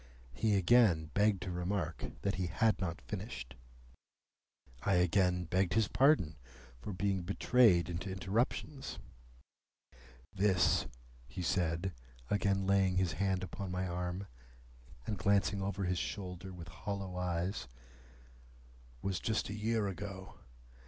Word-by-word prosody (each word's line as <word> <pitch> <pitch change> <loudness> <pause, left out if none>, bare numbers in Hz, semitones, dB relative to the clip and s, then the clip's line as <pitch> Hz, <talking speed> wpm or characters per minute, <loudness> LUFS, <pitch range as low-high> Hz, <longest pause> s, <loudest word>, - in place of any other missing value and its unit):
He 105 - +2
again 90 -6 +4
begged 100 -3 +3
to 95 - -4
remark 90 +2 -2 0.2
that 100 - +1
he 90 0 -1
had 110 +5 +2
not 85 -2 -2
finished. 95 - -6 1.3
I 100 - +2
again 90 0 +3
begged 90 +2 +1
his 110 -2 +4
pardon 130 - +3 0.4
for 105 - -6
being 95 0 0
betrayed 100 -1 +4
into 90 +3 -4
interruptions. 115 +8 -2 1.4
"This," 95 -4 +3 0.4
he - - -5
said, 85 +1 0 0.4
again 100 -1 +2
laying 95 -1 +3
his 95 -2 +2
hand 95 +1 0
upon 95 +1 -5
my 90 +1 -2
arm, 90 +2 -3 0.8
and 105 - -3
glancing 100 0 +2
over 100 0 -2
his 90 -1 0
shoulder 95 -1 -5
with 85 -2 -9
hollow 100 0 -5
eyes, 90 -3 -2 1.4
"was 95 -2 -1
just 110 -2 -1
a - - -3
year 110 0 0
ago. 95 0 -7
95 Hz, 125 wpm, -34 LUFS, 90-100 Hz, 1.4 s, again